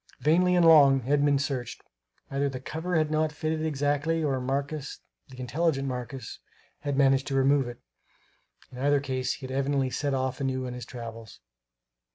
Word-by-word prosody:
Vainly 180 +4 +3
and 175 -1 +4
long 140 -5 +7
Edmund 145 0 +2
searched; 130 -5 -4 0.5
either 140 +1 0
the 130 -1 -6
cover 160 +6 -4
had 155 -1 +1
not 155 0 +1
fitted 155 +1 -2
exactly, 150 +2 0
or 135 -3 0
Marcus, 140 +3 -3 0.3
the 130 -1 -12
intelligent 135 +2 0
Marcus, 125 -2 -6 0.4
had 145 -1 -3
managed 135 -1 +3
to 135 - -2
remove 135 0 +3
it; 120 -1 -8 0.9
in 125 - -10
either 145 +1 +3
case 130 -2 -2
he 135 - -9
had 130 - -6
evidently 135 -1 0
set 140 0 -1
off 130 0 -2
anew 130 -1 -1
on 125 - -5
his 125 -1 -8
travels. 115 -3 -9
140 Hz, 170 wpm, -27 LUFS, 130-150 Hz, 0.9 s, long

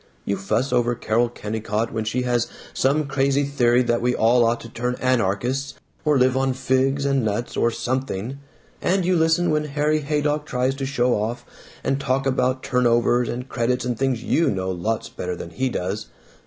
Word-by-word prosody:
You 100 - 0
fuss 110 +7 -1
over 120 -1 +2
Carol 115 +2 +1
Kennicott 110 0 -3
when 110 -1 -2
she 125 +3 -1
has 120 -1 +1 0.3
some 145 +3 +2
crazy 140 +1 +1
theory 125 -3 +3
that 120 -1 +1
we 125 +1 +1
all 120 +2 +4
ought 115 +1 +1
to - - -9
turn 125 +2 -2
anarchists 130 +3 0 0.3
or 150 -2 +3
live 130 0 +3
on 135 0 +1
figs 130 +2 +1
and 135 -2 +2
nuts 110 +3 -2
or 115 - +3
something. 130 0 -3 0.4
And 185 0 +1
you 185 0 +3
listen 165 +1 +3
when 150 0 +1
Harry 150 +1 +1
Haydock 150 0 -1
tries 125 +1 0
to 135 -1 -3
show 125 -3 +1
off 110 +3 -2 0.4
and 135 - 0
talk 135 0 0
about 130 -1 +1
turnovers 120 -1 +2
and 125 +2 -4
credits 125 0 -1
and 125 -1 -1
things 130 -1 -1
you 165 - +2
know 95 -1 -1
lots 105 +5 -2
better 90 0 -5
than 85 - -8
he 130 +10 -1
does. 100 -1 -3
125 Hz, 185 wpm, -23 LUFS, 115-135 Hz, 0.4 s, all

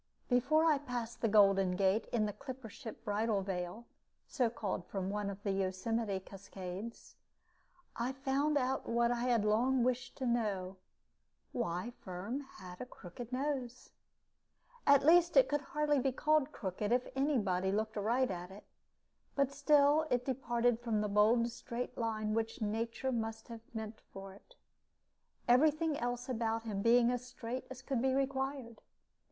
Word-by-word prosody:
Before 290 +6 +3
I 305 -3 +4
passed 245 -4 -5
the 230 - +3
Golden 195 -3 +5
Gate 195 +3 +2
in 220 -3 +1
the 210 - -3
clipper 260 -3 -8
ship 225 +1 -10
Bridal 210 -1 0
Veil 185 +4 -4 0.4
(so 250 -5 +1
called 205 -5 -3
from 195 -1 -3
one 205 -1 -2
of 200 +1 -8
the 200 - 0
Yosemite 195 +2 -1
cascades) 195 +2 -8 0.8
I 240 +2 -1
found 275 +2 0
out 265 0 -1
what 235 0 +2
I 240 0 -1
had 235 -4 +2
long 240 +4 +3
wished 250 0 -1
to 265 - -3
know 200 -6 -1 0.7
why 220 -1 -2
Firm 195 +8 -4
had 185 -9 -11
a - - -4
crooked 235 +2 -10
nose. 255 -2 -3 1.0
At 280 -1 +6
least, 345 +4 +6
it - - +7
could 290 0 0
hardly 295 0 +1
be 265 +1 +1
called 305 +2 +2
crooked 205 - -3
if 245 +1 +2
any 275 +1 +2
body 190 -3 0
looked 220 +2 -1
aright 235 +5 +1
at 180 0 -5
it; 195 +2 -12 0.7
but 275 -1 +2
still 290 +2 +4
it 245 0 +1
departed 245 -3 +1
from 230 -3 0
the 210 - -1
bold 220 +3 +4
straight 240 +1 -5
line 215 -2 -1
which 225 0 -1
nature 230 +4 -2
must 225 -1 -3
have 230 -1 -8
meant 220 -1 -6
for 195 0 -9
it, - - -19 0.9
every 255 +6 +6
thing 310 0 -1
else 245 0 -2
about 225 -2 -1
him 210 -3 -3
being 235 +2 +5
as 250 0 -2
straight 250 0 -6
as 260 0 -9
could 260 -3 -1
be 265 0 +2
required. 270 -3 -2
235 Hz, 160 wpm, -34 LUFS, 210-265 Hz, 1.0 s, it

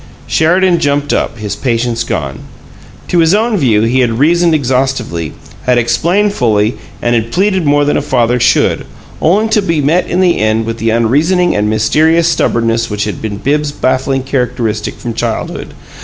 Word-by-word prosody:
Sheridan 175 +2 +2
jumped 145 0 0
up, - - -1
his 105 -2 -4
patience 115 -2 -1
gone. 70 -11 -4 0.7
To 175 - +1
his 165 +3 +4
own 225 +1 +1
view, 120 - +2
he 120 +3 +1
had 115 -3 +1
reasoned 170 +4 +3
exhaustively, 125 - -1 0.3
had 125 -1 +2
explained 170 - +1
fully 110 - +1 0.3
and 120 - +1
had 115 -1 -1
pleaded 190 -3 +1
more 145 0 +3
than 145 - +1
a - - 0
father 125 -4 +1
should, 120 0 +2 0.4
only 200 +7 +2
to 215 -1 +2
be 165 -5 -1
met 155 +5 +1
in 180 - -1
the 180 -2 +2
end 110 +1 +1
with 115 0 -4
the 115 - 0
unreasoning 150 +11 +2
and 105 +1 0
mysterious 155 +10 +2
stubbornness 115 -7 0
which 105 -1 -2
had 105 - -5
been 105 -2 -4
Bibbs's 145 +6 -1
baffling 130 0 -1
characteristic 120 -5 -2
from 120 -2 -5
childhood. 115 0 -4
130 Hz, 170 wpm, -13 LUFS, 115-165 Hz, 0.7 s, his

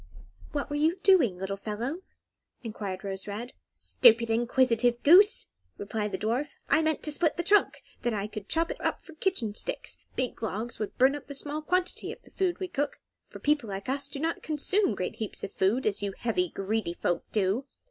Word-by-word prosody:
"What 290 -1 -3
were - - -1
you 320 +5 +2
doing, 315 - +5
little 190 +1 -3
fellow?" 230 - -4 0.6
enquired 205 -4 -5
Rose 195 -1 -5
Red. 220 +5 -5 0.2
"Stupid, 230 -2 +4
inquisitive 240 0 +2
goose!" 385 +7 +6 0.3
replied 210 +1 -3
the 190 - -2
dwarf; 235 +9 -1 0.2
"I 320 - +5
meant 315 -1 0
to 300 - +3
split 315 +1 +1
the 345 - 0
trunk, 405 +4 +3
so 240 - -5
that - - -2
I 200 -1 -1
could 210 -1 -8
chop 330 +1 +1
it - - -7
up - - -1
for 330 - -13
kitchen 310 - -1
sticks; - - -3 0.2
big 255 -3 -2
logs 220 +2 -3
would 215 - -4
burn 265 +2 +5
up 290 - -9
the 280 - -7
small 295 +2 0
quantity 360 +3 -1
of - - -8 0.2
food 370 -3 0
we 375 - -3
cook, 290 -4 -2 0.3
for - - -9
people 290 -7 +1
like 195 +3 -5
us 275 +1 -1
do 280 - -7
not 325 +3 -1
consume 310 - +1
great 185 - -4
heaps 220 -2 -5
of - - -5
food, 210 +8 +1
as 205 -2 +2
you 200 -1 -2
heavy, 190 -7 0
greedy 195 -2 -2
folk 175 - -1
do. 210 +6 0
240 Hz, 200 wpm, -28 LUFS, 210-305 Hz, 0.6 s, goose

